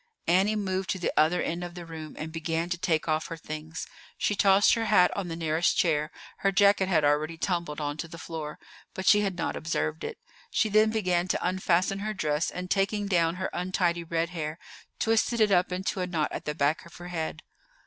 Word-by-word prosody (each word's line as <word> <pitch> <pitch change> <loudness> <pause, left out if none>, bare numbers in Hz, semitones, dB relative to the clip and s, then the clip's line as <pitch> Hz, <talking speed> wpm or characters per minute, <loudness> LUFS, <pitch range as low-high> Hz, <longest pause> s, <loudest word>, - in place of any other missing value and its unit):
Annie 190 +5 +3
moved 190 -2 -2
to 190 - 0
the 180 - -2
other 160 +3 +3
end 170 +2 -2
of 175 0 -7
the 175 -1 -7
room 160 -2 -8
and 160 +1 -5
began 165 +1 -2
to 170 - 0
take 165 -3 0
off 155 0 0
her 165 - -6
things. 155 0 -6 0.3
She - - +1
tossed 195 0 +5
her 230 -1 0
hat 195 -4 +4
on 195 -3 -3
the 165 - -4
nearest 165 0 +1
chair; 155 -3 +2 0.3
her 195 - +1
jacket 200 0 +4
had 160 -5 +3
already 155 +3 +1
tumbled 170 -4 -2
on 145 0 -3
to 165 - -4
the 165 - -10
floor, 160 -2 -6 0.4
but 190 - -4
she 210 +2 +6
had 195 -3 -1
not 170 - -2
observed 155 0 -2
it. - - -5 0.3
She 220 - +1
then 215 +1 +5
began 185 -5 +1
to 180 - 0
unfasten 185 +1 +1
her 215 +1 -3
dress, 150 -3 0
and, 180 0 -6
taking 205 +1 +1
down 170 -4 +2
her 185 +1 -3
untidy 175 -1 0
red 165 0 -1
hair, 155 -3 -4 0.4
twisted 225 +1 +1
it 215 -2 +4
up 180 -1 +3
into 190 +2 -2
a 180 - -1
knot 165 -4 -1
at - - -5
the 150 - -2
back 145 +1 +1
of 170 - -16
her 175 0 -9
head. 160 -2 -4
175 Hz, 220 wpm, -28 LUFS, 160-190 Hz, 0.4 s, she